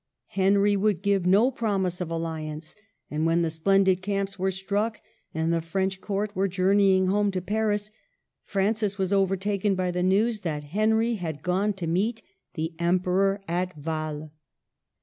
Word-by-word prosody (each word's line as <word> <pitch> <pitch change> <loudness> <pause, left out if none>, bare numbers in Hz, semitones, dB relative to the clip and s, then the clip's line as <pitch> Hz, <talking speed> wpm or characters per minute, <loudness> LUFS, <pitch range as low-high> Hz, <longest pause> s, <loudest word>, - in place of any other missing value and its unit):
Henry 200 +1 +3
would 200 -2 +1
give 200 -3 +1
no 210 +8 +5
promise 195 -7 -1
of 175 - -3
alli 165 -2 -3
ance; 155 +1 -8 0.4
and 155 +2 0
when 170 +1 +2
the 165 - 0
splendid 190 +3 +3
camps 195 0 -2
were 190 +1 +1
struck, 205 +3 -2 0.3
and 160 +1 0
the 165 - +1
French 190 +3 -2
court 205 0 -2
were 195 +1 +1
journeying 190 +1 +3
home 205 +2 +2
to 190 -2 -2
Paris, 210 +2 -1 0.5
Francis 205 0 0
was 190 0 0
overtaken 195 +1 +1
by 185 -1 -1
the 180 0 -2
news 205 +4 +2
that 155 -5 -3
Henry 220 +8 +1
had 160 -5 -5
gone 190 +4 +1
to 190 -3 -5
meet 210 +8 0 0.3
the 160 0 -3
Emperor 185 +3 +1
at 180 0 -2
Wael. 155 0 -4
190 Hz, 160 wpm, -26 LUFS, 170-205 Hz, 0.5 s, no